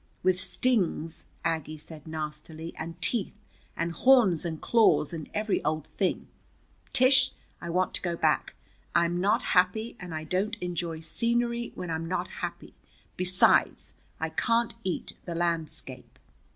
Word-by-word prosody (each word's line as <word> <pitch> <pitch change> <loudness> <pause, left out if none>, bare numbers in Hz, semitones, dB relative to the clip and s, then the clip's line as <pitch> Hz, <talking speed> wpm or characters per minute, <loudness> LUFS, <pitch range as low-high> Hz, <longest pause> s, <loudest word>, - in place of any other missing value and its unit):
"With 185 0 +3
stings," 185 -10 0 0.2
Aggie 160 -1 -1
said 155 0 -11
nastily, 155 +1 -5
"and 165 +1 -7
teeth, 220 -4 +1 0.4
and 170 +1 -1
horns, 210 - +5
and 160 -2 -3
claws, 225 -9 +3
and 160 -3 -6
every 210 -1 0
old 155 0 -1
thing! 190 -3 0 0.6
Tish, 260 +1 +6 0.3
I 170 - -5
want 180 +2 +1
to - - 0
go 175 -2 -1
back. - - +1 0.4
I'm 170 +1 +2
not 210 +5 +2
happy, 200 +6 +2
and 180 -2 -8
I 155 - -4
don't 190 +7 -1
enjoy 170 -2 -3
scenery 235 +6 0
when 180 -2 -5
I'm 160 +1 -2
not 185 - -1
happy. - - -5 0.4
Besides, 185 0 +3 0.3
I - - -1
can't 230 0 +1
eat 185 - -3
the 170 - -4
landscape." 165 -2 -3
175 Hz, 140 wpm, -28 LUFS, 160-215 Hz, 0.6 s, Tish